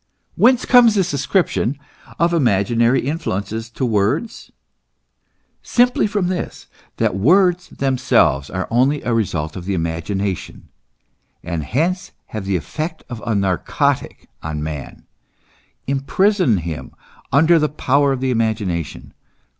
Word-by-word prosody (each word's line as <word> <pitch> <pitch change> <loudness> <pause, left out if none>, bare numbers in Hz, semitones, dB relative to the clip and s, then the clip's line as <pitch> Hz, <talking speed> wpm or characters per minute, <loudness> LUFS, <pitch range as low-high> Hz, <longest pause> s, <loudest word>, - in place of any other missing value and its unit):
Whence 255 0 +4
comes 240 -4 +6
this 185 -5 +1
ascription 140 - 0 0.4
of 170 0 +2
imaginary 120 - +2
influences 115 - -3
to 125 +2 -3
words? 115 - -1 1.1
Simply 245 -2 +2
from 205 -2 -1
this, 180 -1 -4 0.3
that - - +1
words 180 - +3
themselves 130 - +1
are 95 0 -3
only 135 +5 +2
a 125 - 0
result 85 -9 -1
of 90 -2 -7
the 100 0 -1
imagination, 85 +3 -3 0.7
and 85 -3 -3
hence 165 - -1 0.2
have 110 -3 -4
the 95 -1 0
effect 155 - -5
of 115 -2 -6
a 115 - +1
narcotic 95 -4 -1
on 75 -1 -4
man, 75 -3 -7 0.8
imprison 140 - +2
him 85 -2 -6 0.4
under 160 +5 +5
the 150 -1 +1
power 140 0 +1
of 130 -1 -2
the 130 -1 0
imagination. 105 - -2
125 Hz, 120 wpm, -19 LUFS, 95-160 Hz, 1.1 s, comes